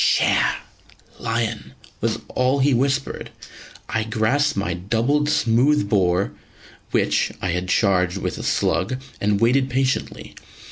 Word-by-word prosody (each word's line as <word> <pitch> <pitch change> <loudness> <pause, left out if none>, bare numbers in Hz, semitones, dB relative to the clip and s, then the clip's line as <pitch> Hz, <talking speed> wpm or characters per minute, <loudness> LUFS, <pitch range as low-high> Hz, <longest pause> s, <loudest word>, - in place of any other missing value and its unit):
"Sher!" - - +3 0.6
("Lion!") 115 - -3 0.3
was - - 0
all 130 +2 +1
he 140 0 +3
whispered. 135 +2 -1 0.6
I 110 -1 -1
grasped 115 +5 +1
my 95 -3 -1
double 115 +11 0
smooth 140 -3 +2
bore, 95 -2 +2 0.6
which, - - +1
I 90 - -2
had 90 +1 -2
charged 90 -2 +2
with - - -4
slug, 95 +8 0 0.2
and 100 0 +1
waited 130 +4 +3
patiently. 130 +1 -2
115 Hz, 120 wpm, -22 LUFS, 100-135 Hz, 0.6 s, Sher